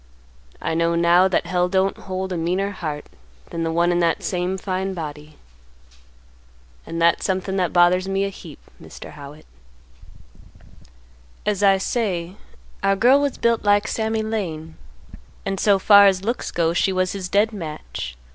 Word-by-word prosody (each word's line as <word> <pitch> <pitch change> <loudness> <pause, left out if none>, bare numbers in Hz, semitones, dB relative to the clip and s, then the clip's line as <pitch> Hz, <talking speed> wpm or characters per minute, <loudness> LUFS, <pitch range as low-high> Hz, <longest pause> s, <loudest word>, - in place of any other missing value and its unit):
I 165 - -2
know 170 +1 +1
now 170 +2 +4
that 185 - 0
Hell 180 0 0
don't 190 +1 +1
hold 190 0 -5
a - - -2
meaner 180 +4 -1
heart 155 -6 -5 0.5
than 165 - -4
the 165 0 -1
one 170 +2 +2
in 175 - +1
that 170 -1 +1
same 180 +1 -2
fine 190 0 -3
body. 150 -2 -8 1.5
And 165 - -5
that's 170 0 +3
somethin' 190 0 -1
that 180 -2 0
bothers 180 +1 +3
me 195 0 0
a - - -2
heap, 170 -6 -12 0.2
Mr. - - -11
Howitt. 145 +2 -12 2.0
"As 205 -2 0
I 195 -1 +5
say, 190 -4 -2 0.5
our 195 0 +2
girl 250 +7 +4
was 285 -2 -1
built 235 -1 +1
like 205 0 +3
Sammy 220 0 -1
Lane, 165 -8 -4 0.7
and 195 -1 -2
so 200 -2 +4
far 200 +1 +7
as 190 -1 +1
looks 235 +3 -2
go 165 -1 0
she 190 - +1
was 185 -1 0
his 190 -2 -5
dead 210 +4 +2
match. 70 - -7
185 Hz, 160 wpm, -22 LUFS, 170-195 Hz, 2.0 s, far